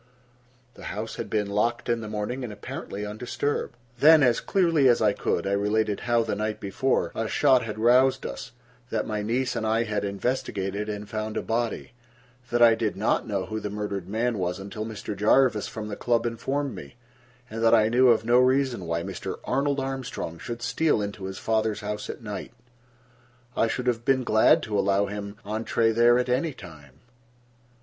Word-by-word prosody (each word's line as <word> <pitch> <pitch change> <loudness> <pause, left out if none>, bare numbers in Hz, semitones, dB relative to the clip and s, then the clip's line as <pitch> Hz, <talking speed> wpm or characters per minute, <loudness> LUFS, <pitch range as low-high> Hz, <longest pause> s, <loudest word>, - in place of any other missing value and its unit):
The - - -12
house 110 +2 -5
had - - -5
been 105 -2 0
locked 115 +4 0
in 120 -1 0
the 110 - -6
morning 110 +5 -3
and 120 - -5
apparently 105 0 -6
undisturbed. 120 +6 -3 0.2
Then, 155 +1 +7
as 120 -3 +3
clearly 165 -8 +3
as 120 - +4
I 105 -2 +3
could, - - -1
I 100 - -1
related 105 +1 +1
how, 120 -1 +1
the 110 - -2
night 105 +1 -2
before, 115 +7 0
a 115 - -2
shot 130 +1 +4
had 110 -2 -5
roused 130 +4 +4
us; - - -6 0.4
that 110 -3 -1
my 105 -1 -2
niece 125 +5 -1
and 115 - -2
I 110 +1 +2
had 105 -2 -2
investigated 100 -1 -2
and 105 0 -5
found 110 -1 -4
a - - -2
body; 115 0 -2 0.6
that 120 0 +3
I 115 -1 +8
did 110 -3 -2
not 105 +2 0
know 100 -3 -2
who 110 0 -4
the 105 - -4
murdered 100 -3 -4
man 115 +1 -1
was 90 0 -1
until 100 +3 -6
Mr. 105 -1 -6
Jarvis 110 +2 +3
from 110 -1 -6
the 105 - -5
club 120 +1 0
informed 135 +4 -2
me, 70 -8 -10 0.5
and 115 0 -5
that 115 0 +6
I 110 -1 +4
knew 125 +3 +4
of 115 -2 +4
no 120 +2 +5
reason 130 -5 +2
why 85 0 -1
Mr. - - -5
Arnold 140 +1 0
Armstrong 135 -10 -4
should 120 0 -6
steal 125 +2 +1
into 100 -2 -4
his 95 0 -6
father's 110 -1 0
house 105 0 -5
at - - -7
night. 105 +1 -6 1.0
I 115 - +2
should 125 +2 -3
have 120 -2 0
been 130 0 +2
glad 110 -2 +4
to 105 -2 -1
allow 100 +1 +2
him 100 0 -6
entree 115 +2 0
there 120 +2 +5
at 125 - 0
any 135 +5 0
time. 75 - -14
110 Hz, 190 wpm, -26 LUFS, 105-125 Hz, 1.0 s, I